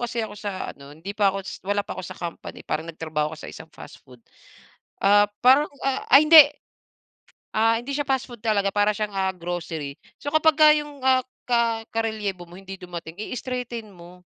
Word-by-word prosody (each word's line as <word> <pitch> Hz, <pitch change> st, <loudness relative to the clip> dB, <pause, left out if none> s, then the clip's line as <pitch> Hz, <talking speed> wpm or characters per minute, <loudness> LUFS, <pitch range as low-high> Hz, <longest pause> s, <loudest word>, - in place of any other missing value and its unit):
kasi 235 Hz, -1 st, -2 dB
ako 210 Hz, -, -8 dB
sa 200 Hz, -3 st, -5 dB
ano 140 Hz, 0 st, -15 dB
hindi 190 Hz, +5 st, -7 dB
pa 205 Hz, -1 st, +3 dB
ako 195 Hz, 0 st, -3 dB
s -, -, -8 dB
wala 205 Hz, +1 st, -1 dB
pa -, -, -6 dB
ako -, -, -6 dB
sa -, -, -9 dB
company 170 Hz, -1 st, -8 dB
parang 160 Hz, +2 st, -3 dB
nagtrabaho 155 Hz, -2 st, -3 dB
ako -, -, -15 dB
sa -, -, -7 dB
isang 160 Hz, -, -11 dB
fast 145 Hz, -, -13 dB
food, 125 Hz, -3 st, -19 dB, 0.8 s
ah, 205 Hz, +1 st, +5 dB, 0.2 s
parang, 265 Hz, +4 st, +6 dB, 0.2 s
ah, 270 Hz, -1 st, -1 dB
ay 275 Hz, -, +10 dB
hindi. 320 Hz, -2 st, +12 dB, 1.1 s
Ah, 225 Hz, +1 st, +3 dB
hindi 245 Hz, +4 st, -5 dB
siya 290 Hz, 0 st, -2 dB
fast 265 Hz, -1 st, +1 dB
food 240 Hz, -4 st, -12 dB
talaga, 200 Hz, -3 st, +1 dB
para 205 Hz, 0 st, +2 dB
siyang, 210 Hz, -2 st, -3 dB
ah, 190 Hz, -1 st, 0 dB
grocery 170 Hz, -4 st, -5 dB, 0.2 s
so 285 Hz, +1 st, -6 dB
kapagka 310 Hz, -1 st, +6 dB
yung 295 Hz, -3 st, -3 dB
ah 260 Hz, -1 st, +5 dB, 0.2 s
ka 230 Hz, -2 st, +1 dB
karelyebo 210 Hz, -6 st, -3 dB
mo 175 Hz, -, -13 dB
hindi 195 Hz, 0 st, -10 dB
dumating 175 Hz, -1 st, -8 dB
i-straighten 240 Hz, -2 st, -5 dB
mo. 180 Hz, 0 st, -15 dB
205 Hz, 190 wpm, -24 LUFS, 180-245 Hz, 1.1 s, hindi